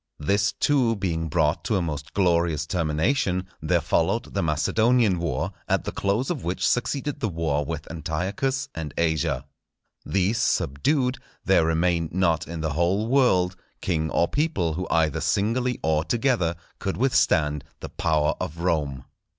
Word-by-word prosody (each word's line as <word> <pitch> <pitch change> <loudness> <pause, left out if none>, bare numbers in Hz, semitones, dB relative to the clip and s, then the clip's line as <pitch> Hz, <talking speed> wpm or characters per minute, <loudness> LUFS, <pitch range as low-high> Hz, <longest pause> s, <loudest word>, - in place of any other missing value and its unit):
This 100 +6 +1
too 130 -6 +2
being 85 -5 -2
brought 75 0 +1
to 110 - +1
a 95 - +2
most 75 -3 -5
glorious 85 -5 +2
termination, 90 - 0
there - - +2
followed - - 0
the - - 0
Macedonian 105 +6 +2
war, 80 -6 -2 0.2
at - - +1
the - - -4
close 105 - 0
of 155 -8 -4
which 90 +2 0
succeeded 140 +3 -1
the 110 - -1
war 80 -4 -1
with 80 0 -5
Antiochus 95 - -2
and 80 -4 -6
Asia. 80 -5 0 0.6
These 100 +4 0
subdued, 125 - +1 0.3
there 90 -4 +4
remained 85 0 +1
not 85 -5 +1
in 85 0 -5
the 80 -2 -1
whole 90 +7 +1
world, 95 -9 +3 0.2
king 80 -3 -1
or 85 - +2
people 140 - 0
who 90 +3 -3
either 80 -1 +1
singly 115 - 0
or 80 -1 +2
together 115 -6 +1 0.2
could 95 -2 -3
withstand 80 - +2 0.2
the - - -6
power 75 -2 +1
of 80 - -4
Rome. 75 -7 -1
85 Hz, 150 wpm, -25 LUFS, 80-110 Hz, 0.6 s, there